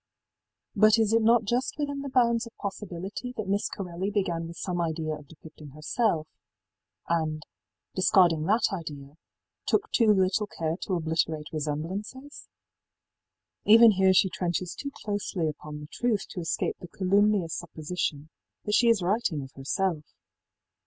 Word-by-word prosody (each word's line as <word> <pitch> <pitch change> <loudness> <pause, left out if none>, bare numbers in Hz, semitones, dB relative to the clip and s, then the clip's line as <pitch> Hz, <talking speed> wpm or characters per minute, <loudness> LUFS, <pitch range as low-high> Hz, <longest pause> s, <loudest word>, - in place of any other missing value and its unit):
í - - -5
But 215 +1 +7
is 220 -1 +2
it 230 - +4
not 230 +1 +4
just 240 +5 -1
within 285 -1 -2
the 280 - -5
bounds 235 -2 +2
of 230 - -15
possibility 200 +4 -6
that 215 - -3
Miss 200 +1 0
Corelli 185 0 -4
began 175 -5 -1
with 170 0 -10
some 175 -1 -2
idea 160 -1 -2
of 150 -1 -9
depicting 155 -1 -13
herself, 155 +1 0 0.8
and, 155 -2 -1 0.5
discarding 180 -4 +4
that 215 +1 +2
idea, 145 -5 -7 0.5
took 435 +1 +1
too 225 -3 +4
little 195 +1 +2
care 160 -4 -3
to 185 - 0
obliterate 160 -2 -1
resemblances? 185 - -5 1.2
Even 225 +1 +8
here 190 -1 +4
she 185 +1 +5
trenches 175 -1 -2
too 280 - -5 0.2
closely 205 -5 -1
upon 150 0 -6
the 150 - -9
truth 230 -5 0
to - - -6
escape 165 -2 -2
the 180 - -9
calumnious 195 -1 +2
supposition 155 -2 -4 0.3
that 210 - -1
she 235 +3 +4
is 220 -5 +3
writing 185 -6 0
of 135 - -11
herself. 155 +4 -1
185 Hz, 150 wpm, -27 LUFS, 160-215 Hz, 1.2 s, Even